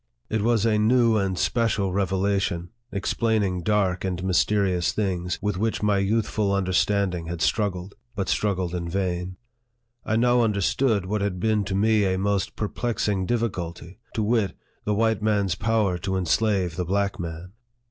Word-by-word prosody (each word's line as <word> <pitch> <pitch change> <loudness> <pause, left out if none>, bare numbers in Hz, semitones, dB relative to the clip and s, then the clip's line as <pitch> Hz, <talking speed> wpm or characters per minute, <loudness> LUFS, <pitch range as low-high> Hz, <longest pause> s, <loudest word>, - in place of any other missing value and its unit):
It 110 -1 +1
was 115 -1 +2
a 110 -2 +3
new 115 +1 +4
and 95 -3 -1
special 100 0 +1
revelation, 95 -2 0 0.2
explaining 100 -2 0
dark 95 -2 +1
and 90 -1 -2
mysterious 95 -1 +1
things, 90 -4 -1
with 105 -2 -1
which 110 0 -1
my 105 -1 +3
youthful 105 0 0
understanding 95 -2 +1
had 85 0 -4
struggled, 100 -1 -1 0.2
but 100 -2 -2
struggled 95 -4 0
in 85 -1 -3
vain. 90 0 -2 0.7
I 110 - -1
now 120 +1 +3
understood 105 0 +1
what 105 +2 -1
had 100 -3 -2
been 110 +1 +1
to 95 - -2
me 105 +1 +3
a 95 - 0
most 100 0 -1
perplexing 105 -3 -1
difficulty 95 -5 -3 0.2
to 110 - 0
wit, 105 -3 +1 0.3
the 105 - +1
white 110 0 +1
man's 105 -4 +1
power 100 -2 0
to 95 +1 -2
enslave 95 -1 +1
the 90 - -1
black 100 +2 -1
man. 85 +1 -6
100 Hz, 155 wpm, -25 LUFS, 90-110 Hz, 0.7 s, new